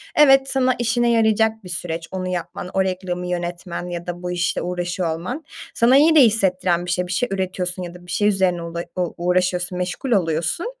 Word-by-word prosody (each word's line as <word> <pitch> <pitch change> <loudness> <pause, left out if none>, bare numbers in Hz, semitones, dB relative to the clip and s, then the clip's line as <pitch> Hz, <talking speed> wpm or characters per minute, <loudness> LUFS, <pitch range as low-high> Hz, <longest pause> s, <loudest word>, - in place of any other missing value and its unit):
Evet, 270 -2 +6
sana 255 -1 +2
işine 240 0 +2
yarayacak 220 -1 +2
bir 180 - -10
süreç, 170 -1 -4
onu 185 -1 -3
yapman, 180 0 -4
o 190 - +2
reklamı 180 -1 -3
yönetmen 175 0 -4
ya 175 0 -6
da 175 0 -5
bu 180 - -3
işle 175 0 -1
uğraşıyor 175 -1 -2
olman 245 - -5 0.3
sana 245 +3 +5
iyi 315 +3 +5
de - - +8
hissettiren 185 -6 +2
bir - - -6
şey; 180 0 -1
bir - - -6
şey 245 +6 0
üretiyorsun 185 -1 -2
ya 175 -1 -7
da 180 0 -14
bir 175 - -9
şey 205 - +2
üzerine 190 -4 +2
ula 170 0 -5
u 180 -2 -1
uğraşıyorsun, 180 0 0
meşgul 180 +8 -3
oluyorsun. 165 - 0
180 Hz, 200 wpm, -21 LUFS, 175-220 Hz, 0.3 s, de